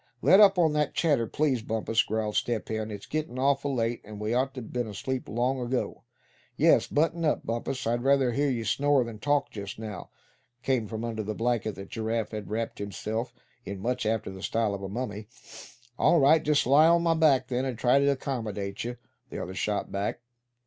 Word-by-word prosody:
"Let 190 - +7
up 200 -2 +7
on 160 -3 +3
that 150 -1 0
chatter, 145 -9 +2
please, 140 -4 0
Bumpus," 110 0 0
grumbled 110 -1 -2
Step 115 -3 -1
Hen. 110 0 -2
"It's 105 -2 -7
gettin' 155 -5 -3
awful 140 +1 +1
late, 115 0 -1
and 105 0 -10
we 105 +2 -1
ought 130 +2 0
to 130 - -5
been 120 +1 -3
asleep 125 +6 -4
long 125 +4 0
ago." 125 +1 -2 0.6
"Yes, - - +4
button 165 +3 0
up, 155 - 0
Bumpus, 120 +3 -3
I'd 120 +1 0
rather 135 -1 +3
hear 140 +4 +1
you 115 -4 -2
snore 140 +4 +2
than 115 -2 -8
talk 145 +2 +1
just 100 -2 -7
now," 110 -2 -7 0.5
came 130 -5 0
from 110 +2 -4
under 115 -2 -3
the 110 0 -4
blanket 115 -2 -1
that 95 0 -9
Giraffe 110 0 -2
had 105 -2 -6
wrapped 110 +2 -3
himself 110 +4 -4 0.3
in, 100 -4 -6
much 125 +2 -1
after 110 -3 -1
the 95 0 -9
style 110 0 0
of 100 - -5
a 95 - -5
mummy. 105 -2 -5 0.7
"All 170 - +5
right. 150 +3 +6
I'll - - -15
just 150 0 +3
lie 145 +5 +6
on 170 0 +4
my 165 -1 +3
back, 145 -6 +3
then, 125 0 0
and 130 -3 -3
try 125 +3 +4
to 140 0 +3
accommodate 105 -8 -3
you," 120 +1 -5 0.3
the - - -7
other 95 - -5
shot 100 +3 -2
back. 100 +4 -2
120 Hz, 205 wpm, -28 LUFS, 110-140 Hz, 0.7 s, Let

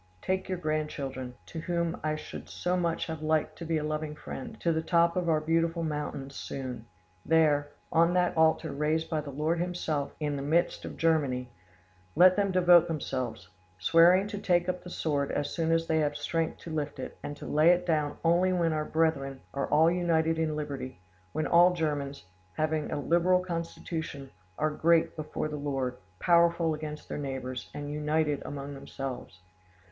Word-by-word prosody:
Take 190 0 -1
your 185 - -1
grandchildren, 145 -6 -3
to 125 - -7
whom 170 0 -1
I 155 0 0
should 155 - -8
so 180 +1 -1
much 170 -2 0
have 160 -2 -5
liked 155 0 0
to 170 - -5
be 165 0 0
a 150 - -2
loving 155 0 -3
friend, 135 -3 -8
to 170 - +2
the 160 - 0
top 170 0 +3
of 180 -2 0
our 155 -1 +3
beautiful 165 +2 0
mountains 150 -3 -4
soon. 125 -4 -6 0.4
There, 150 -3 +3 0.2
on 170 +2 +4
that 180 -1 +2
altar 160 -1 +3
raised 155 +3 -1
by 155 -1 0
the 145 - -8
Lord 155 +5 -1
Himself 170 -5 -2
in 145 -2 -1
the - - -3
midst 165 +5 +1
of - - -7
Germany, 140 -7 +1 0.6
let 185 +2 +7
them 200 -1 +1
devote 175 -2 +6
themselves, 130 - -3 0.3
swearing 170 - +5
to 205 -1 -4
take 175 -3 +2
up 180 0 -2
the 180 - -8
sword 145 -5 -1
as 145 - -1
soon 165 -1 0
as 165 0 +2
they 160 -1 +1
have 145 -1 0
strength 160 +2 -1
to 165 - -7
lift 150 -2 -3
it, - - -6
and 145 - -6
to - - -9
lay 155 +3 +4
it 180 0 +4
down 155 -4 0
only 175 +3 +4
when 170 -3 +1
our 155 0 -1
brethren 145 -5 0
are 140 - -1
all 160 +3 +4
united 165 -2 +1
in 155 -1 0
liberty, 140 -7 -5 0.3
when 155 - -1
all 175 +1 +6
Germans, 145 - -2 0.3
having 155 -1 -1
a - - -1
liberal 175 +4 +3
constitution; 165 -4 -5 0.3
are 155 0 +1
great 165 +2 +3
before 155 0 -3
the 150 -1 -5
Lord, 135 -3 -2 0.2
powerful 170 - +3
against 150 0 -6
their - - -4
neighbours, 130 -3 -5
and 145 0 -6
united 150 -1 0
among 140 0 -6
themselves. 130 -8 -7
155 Hz, 180 wpm, -29 LUFS, 145-170 Hz, 0.6 s, let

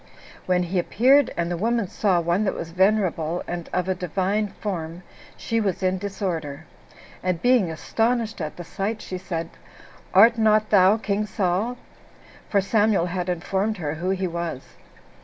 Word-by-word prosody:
When 180 -1 +2
he 180 +1 -1
appeared, 260 +9 +4
and 170 0 -1
the 175 - -1
woman 230 -2 +1
saw 185 -1 +1
one 170 +4 +1
that 195 - 0
was 165 - -6
venerable, 180 -3 +1
and 175 -1 -5
of 180 0 -1
a 190 - +2
divine 190 +4 -1
form, 175 -4 -5 0.3
she 230 0 -1
was 195 -3 -1
in 185 0 +1
disorder; 165 -7 -4 0.6
and 180 -2 -1
being 245 -3 +3
astonished 225 +6 -1
at 155 -1 -4
the 175 - -6
sight, 200 +5 -3
she 185 - -5
said, 170 -3 -4 0.6
"Art 225 +4 +6
not 215 -1 +3
thou 200 +1 +6
king 210 -1 -1
Saul?" 200 +6 -1 0.7
for 200 - +3
Samuel 205 -2 +2
had 180 0 -3
informed 195 +4 -1
her 150 -4 -3
who 170 +4 -3
he 190 0 0
was. 170 -5 -4
190 Hz, 160 wpm, -24 LUFS, 175-215 Hz, 0.7 s, Art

